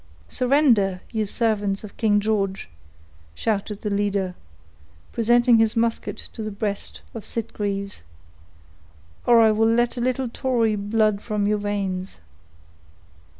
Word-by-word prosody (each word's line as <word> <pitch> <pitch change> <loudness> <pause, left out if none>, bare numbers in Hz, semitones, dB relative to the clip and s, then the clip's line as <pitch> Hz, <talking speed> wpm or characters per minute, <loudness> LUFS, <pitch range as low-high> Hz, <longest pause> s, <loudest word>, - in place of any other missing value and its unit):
"Surrender! 245 -8 +3
you 220 -2 -1
servants 205 -2 0
of 210 - -10
King 210 -2 +2
George," 200 -2 -1 0.7
shouted 210 - -2
the 210 - -1
leader, 200 -2 0 0.8
presenting 240 0 +4
his 225 0 +2
musket 230 0 -1
to - - -9
the 215 - -3
breast 200 0 -4
of 225 - -7
Sitgreaves, 200 - -3 1.3
"or 235 -1 +7
I 220 -1 +6
will 225 +1 +3
let 240 +1 +1
a - - -2
little 255 +1 0
tory 235 -3 0
blood 210 0 +1
from 210 -2 -1
your 210 0 +1
veins." 195 - -3
215 Hz, 125 wpm, -23 LUFS, 200-230 Hz, 1.3 s, or